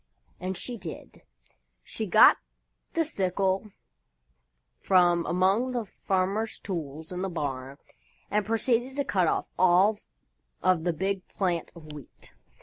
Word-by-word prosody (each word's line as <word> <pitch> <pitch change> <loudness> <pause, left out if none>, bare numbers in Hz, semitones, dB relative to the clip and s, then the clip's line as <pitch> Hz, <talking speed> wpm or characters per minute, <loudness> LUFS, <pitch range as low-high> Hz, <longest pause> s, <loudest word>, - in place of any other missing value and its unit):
And 185 0 -3
she 240 +5 -4
did. 170 -4 -9 0.6
She 220 - -4
got 175 - +7 0.6
the 330 -1 +1
sickle 195 - -1 1.1
from 175 -2 +3
among 195 +8 +2
the 240 -3 -2
farmer's 195 +3 -1
tools 160 -4 -6
in 180 0 -4
the 190 - -2
barn 135 -5 -4 0.5
and 210 0 +2
proceeded 235 +4 0
to 280 -1 -1
cut 185 -4 +1
off - - 0
all 185 +4 +4 0.6
of 180 -3 +2
the 175 - +1
big 190 +3 -2
plant 175 -4 -2
of 155 -3 -11
Wheat. 145 -2 -13
185 Hz, 130 wpm, -27 LUFS, 170-210 Hz, 1.1 s, got